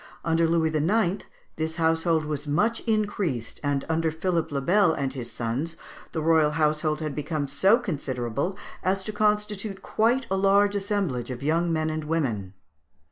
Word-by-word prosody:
Under 165 0 +3
Louis 160 -1 +1
IX. 185 +5 +1 0.3
this 160 0 -2
household 165 -1 +2
was 150 -1 -3
much 210 +11 +1
increased, 205 - -1
and 145 -1 0
under 160 0 +1
Philippe 165 +1 -1
le 140 - 0
Bel 180 +4 +3
and 135 -2 -2
his 120 -3 -6
sons 130 +8 -3 0.4
the 160 - -2
royal 160 -2 +4
household 155 0 +1
had 155 -2 -3
become 150 0 -2
so 190 - +4
considerable 140 - -3 0.2
as 190 +1 0
to 215 - -5
constitute 210 -1 0
quite 235 +4 +1
a 195 - +2
large 200 +1 +4
assemblage 195 - -1
of 125 +1 -6
young 165 +3 +1
men 155 -1 0
and 155 0 -3
women. 115 - -2
160 Hz, 160 wpm, -26 LUFS, 145-195 Hz, 0.4 s, royal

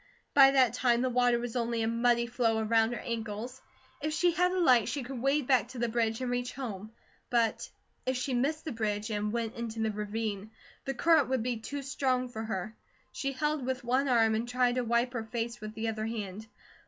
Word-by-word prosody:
By 275 -1 +8
that 260 -4 +4
time 245 -1 +2
the 255 - 0
water 245 0 +3
was 235 0 -5
only 235 -1 0
a - - 0
muddy 235 +1 +2
flow 235 -2 +1
around 225 +1 +2
her - - -4
ankles; 230 +1 -5 0.4
if 305 +1 -1
she 350 +2 +3
had 360 +2 +2
a 370 - -1
light 250 - +4
she 270 +2 -3
could 250 -1 -6
wade 275 +1 +2
back 255 -2 +3
to 255 0 -10
the 235 0 0
bridge 225 0 0
and 250 -1 -2
reach 245 0 -2
home. 215 -5 -6 0.4
But 235 -3 +1 0.4
if 260 0 +1
she 255 +1 -2
missed 290 +6 0
the 315 - -3
bridge 215 -1 -2
and 210 0 -1
went 230 -1 -2
into 230 -1 -5
the 220 -1 +1
ravine, 210 0 -3 0.4
the 270 - -2
current 315 -1 +4
would 260 -3 0
be 245 -1 -1
too 280 +6 -6
strong 260 -2 0
for 220 -2 -6
her. 220 0 -4 0.4
She 275 0 -3
held 300 +1 -1
with 260 +1 -2
one 255 +4 +1
arm 225 -3 +4
and 225 +2 -1
tried 245 0 +2
to 250 0 0
wipe 235 +2 +1
her 230 -2 -2
face 230 0 -4
with 215 0 -7
the 225 +1 -2
other 220 0 -2
hand. 215 -1 -5
240 Hz, 220 wpm, -30 LUFS, 225-255 Hz, 0.4 s, By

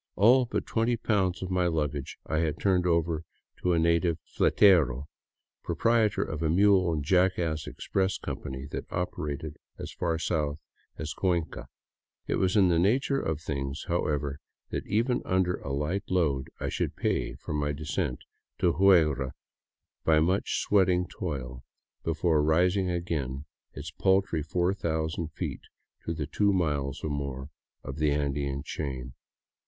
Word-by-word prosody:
All 125 +6 +6
but - - -2
twenty 115 +1 +1
pounds 95 -5 0
of 95 - -4
my 90 -1 +2
baggage 75 -4 -2
I 80 - 0
had 80 -1 -1
turned 90 -3 +2
over 85 -1 +1 0.4
to 90 - +2
a - - +2
native 85 0 +2 0.2
Hetero, 75 - +4 0.6
proprietor 115 -3 +2
of 75 0 -5
a 80 - +1
mule 95 0 +4
and 75 -3 -1
jackass 85 -2 +1
express 95 0 -1
com - - -5
pany 65 +1 -7
that - - -6
operated 75 -3 -3 0.2
as - - -6
far 85 -2 -1
south 75 -3 -1 0.4
as 80 0 -4
Cuenca. 85 -4 -1 0.6
It - - 0
was 95 +2 +2
in 95 -3 +5
the 85 -1 +3
nature 130 +9 +2
of 80 - -2
things, 70 -1 -3
however, 75 -4 -1 0.3
that - - -3
even 115 +5 +1
under 90 -1 +1
a 70 - -6
light 75 +8 -2
load 75 -8 +1
I - - -2
should - - -2
pay - - -1
for - - -6
my 75 0 0
de 75 +2 -6
scent 60 - -2 0.3
to 85 - +2
Huigra 75 -9 +4 0.7
by 80 -1 +4
much 90 +5 +1
sweating 90 -3 +3
toil, 65 -7 -5 0.4
before 80 -1 +2
raising 90 +5 +2
again 75 -6 -2 0.3
its - - -7
paltry 95 -4 +2
4000 80 -1 -1
feet - - -4 0.4
to 85 - -2
the 75 -2 -2
two 100 +7 +2
miles 75 -7 -1
or 75 - -2
more 70 -1 -4 0.3
of 65 +1 -6
the 75 -1 +2
Andean 70 -1 -1
chain. 65 -6 -5
80 Hz, 150 wpm, -28 LUFS, 75-90 Hz, 0.7 s, All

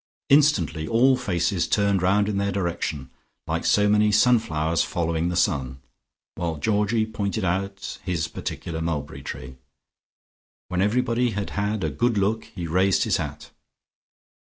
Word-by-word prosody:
Instantly 95 - +3
all 130 +4 +4
faces 95 -7 0
turned 100 -2 +2
round 100 +3 +3
in 105 -2 -1
their 100 0 0
direction, 85 -7 -3 0.3
like 80 0 -2
so 105 0 +3
many 105 0 +3
sunflowers 85 -9 +2
following 85 0 -1
the 90 - -2
sun, 65 -6 0 0.5
while 85 -2 -3
Georgie 105 +6 +1
pointed 110 -1 -3
out 100 +2 -3
his 85 -3 -1
particular 80 0 -5
mulberry 80 -4 -3
tree. 65 0 -8 1.1
When 90 0 0
everybody 120 +3 +1
had 100 - -3
had 105 +1 -1
a - - -1
good 120 -2 0
look, 105 +3 0
he 90 -3 -7
raised 95 +4 +2
his - - +1
hat. - - -6
100 Hz, 140 wpm, -24 LUFS, 85-105 Hz, 1.1 s, all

